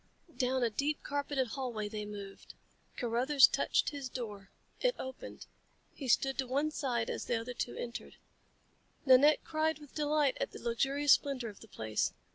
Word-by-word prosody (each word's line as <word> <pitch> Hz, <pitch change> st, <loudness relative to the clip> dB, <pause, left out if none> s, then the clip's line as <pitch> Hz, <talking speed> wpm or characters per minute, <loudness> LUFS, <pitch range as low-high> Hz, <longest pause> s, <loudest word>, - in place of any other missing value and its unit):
Down 255 Hz, -1 st, +1 dB
a 235 Hz, -, +2 dB
deep 285 Hz, +7 st, -1 dB
carpeted 285 Hz, -3 st, -1 dB
hallway 235 Hz, -4 st, -3 dB
they 210 Hz, 0 st, -5 dB
moved. 200 Hz, -1 st, -9 dB, 0.4 s
Carruthers 255 Hz, +4 st, +5 dB
touched -, -, +1 dB
his 280 Hz, -3 st, -5 dB
door. 210 Hz, -6 st, -6 dB, 0.3 s
It -, -, +2 dB
opened. 260 Hz, 0 st, -8 dB, 0.5 s
He 275 Hz, -, -7 dB
stood 270 Hz, +2 st, +2 dB
to 260 Hz, -, 0 dB
one 285 Hz, +4 st, 0 dB
side 245 Hz, -6 st, -1 dB
as -, -, -3 dB
the 235 Hz, -, 0 dB
other 240 Hz, +2 st, -6 dB
two 245 Hz, -, -3 dB
entered. 235 Hz, 0 st, -6 dB, 0.9 s
Nanette 275 Hz, +3 st, +6 dB
cried 315 Hz, 0 st, 0 dB
with 295 Hz, -3 st, -15 dB
delight 295 Hz, -2 st, +1 dB
at -, -, -2 dB
the -, -, -8 dB
luxurious 270 Hz, +4 st, +3 dB
splendor 265 Hz, -5 st, 0 dB
of 205 Hz, -, -12 dB
the 225 Hz, -, -13 dB
place. 110 Hz, -, -1 dB
260 Hz, 165 wpm, -33 LUFS, 230-285 Hz, 0.9 s, Nanette